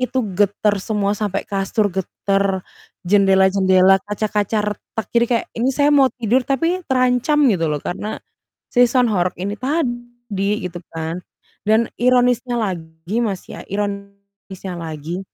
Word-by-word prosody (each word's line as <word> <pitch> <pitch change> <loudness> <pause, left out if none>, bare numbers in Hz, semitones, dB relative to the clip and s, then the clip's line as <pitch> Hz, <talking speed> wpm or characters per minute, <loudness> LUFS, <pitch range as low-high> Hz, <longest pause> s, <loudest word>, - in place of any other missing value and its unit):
Itu 255 -1 0
getar 205 +1 +1
semua 205 0 0
sampai 205 -2 -2
kasur 200 +1 -1
getar, 195 0 -1 0.4
jendela-jendela, 190 0 +4
kaca-kaca 210 +1 -1
retak. 220 +2 -7
Jadi 235 0 +4
kayak 235 -2 0
ini 235 +3 0
saya 290 +2 +2
mau 275 -2 +5
tidur 245 0 +1
tapi 330 +7 +1
terancam 255 +3 +2
gitu 165 -4 0
loh 150 - 0
karena 210 +4 -4 0.6
si 245 -1 +5
sound 245 -2 +2
horeg 180 -2 0
ini 195 +3 -3
tadi 240 - -2
gitu 175 -1 -5
kan. 165 +2 -4 0.4
Dan 220 +2 +2
ironisnya 245 0 +3
lagi 175 -1 -3
Mas, 200 -6 -2
ya - - -8
ironisnya 200 -1 -6
lagi, 160 +2 -5
205 Hz, 135 wpm, -20 LUFS, 190-240 Hz, 0.6 s, mau